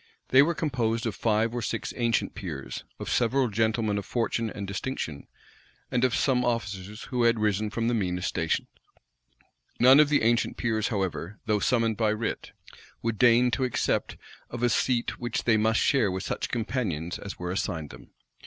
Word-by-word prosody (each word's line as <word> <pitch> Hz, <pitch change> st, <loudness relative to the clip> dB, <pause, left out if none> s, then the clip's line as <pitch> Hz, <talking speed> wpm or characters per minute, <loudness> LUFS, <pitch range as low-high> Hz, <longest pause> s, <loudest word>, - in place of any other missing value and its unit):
They 130 Hz, -, +7 dB
were 165 Hz, +4 st, +2 dB
composed 120 Hz, -7 st, -1 dB
of 115 Hz, -, -1 dB
five 110 Hz, +1 st, +1 dB
or 120 Hz, -, -2 dB
six -, -, -3 dB
ancient 120 Hz, -1 st, 0 dB
peers, 75 Hz, -8 st, -6 dB
of -, -, -7 dB
several 125 Hz, +1 st, +2 dB
gentlemen 110 Hz, -1 st, 0 dB
of 100 Hz, -, -8 dB
fortune 115 Hz, -1 st, -1 dB
and 100 Hz, -1 st, -6 dB
distinction, 95 Hz, -, -4 dB, 0.6 s
and 125 Hz, 0 st, +1 dB
of 125 Hz, -2 st, +3 dB
some 125 Hz, -3 st, +2 dB
officers 105 Hz, -3 st, -3 dB
who 125 Hz, -2 st, 0 dB
had 115 Hz, 0 st, +4 dB
risen 105 Hz, 0 st, 0 dB
from 115 Hz, +1 st, -2 dB
the 120 Hz, -, +1 dB
meanest 90 Hz, -4 st, -1 dB
stations. 80 Hz, -2 st, -1 dB, 1.1 s
None 130 Hz, +3 st, +8 dB
of 150 Hz, -1 st, +6 dB
the 145 Hz, -, +2 dB
ancient 120 Hz, +1 st, +2 dB
peers, 110 Hz, -2 st, 0 dB
however, 95 Hz, -2 st, -3 dB
though 105 Hz, -1 st, +1 dB
summoned 115 Hz, -2 st, +1 dB
by 110 Hz, -2 st, +2 dB
writ, 110 Hz, +1 st, -4 dB, 0.5 s
would 115 Hz, -2 st, -2 dB
deign 120 Hz, 0 st, +5 dB
to 130 Hz, -, 0 dB
accept 125 Hz, -3 st, -1 dB, 0.3 s
of 120 Hz, 0 st, -5 dB
a 120 Hz, -, +4 dB
seat 120 Hz, +1 st, 0 dB
which 120 Hz, -1 st, -2 dB
they 115 Hz, -, +3 dB
must 110 Hz, +1 st, +2 dB
share 130 Hz, -8 st, +3 dB
with 95 Hz, 0 st, -3 dB
such -, -, -3 dB
companions 105 Hz, -, -2 dB
as 100 Hz, -, -7 dB
were 90 Hz, 0 st, -4 dB
assigned 80 Hz, -5 st, -3 dB
them. -, -, -13 dB
115 Hz, 180 wpm, -27 LUFS, 100-120 Hz, 1.1 s, None